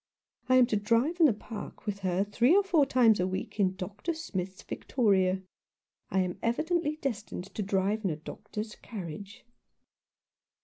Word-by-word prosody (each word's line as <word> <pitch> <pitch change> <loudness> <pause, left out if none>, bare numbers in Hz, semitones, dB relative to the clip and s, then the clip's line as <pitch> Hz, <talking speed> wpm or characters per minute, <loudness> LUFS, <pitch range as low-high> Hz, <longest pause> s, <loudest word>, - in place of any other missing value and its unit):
I 255 - +6
am 255 -1 +7
to 230 -3 0
drive 230 - +1
in 325 - +8
the 250 - +3
park 210 +1 -9
with 205 -2 -3
her 185 0 +1
three 240 - +3
or 405 - +5
four 330 -8 +3
times 235 -6 +5
a 180 - +2
week 190 +3 -5
in 190 -2 +2
Dr. 205 - -4
Smith's 190 - -5
victoria. 190 -6 +1 0.7
I 190 - +2
am 180 -1 -3
evidently 310 +6 0
destined 225 - -5
to - - -3
drive 200 +2 0
in 195 - +1
a 155 - -1
doctor's 210 +7 -7
carriage." 200 +3 -8
210 Hz, 165 wpm, -29 LUFS, 190-255 Hz, 0.7 s, in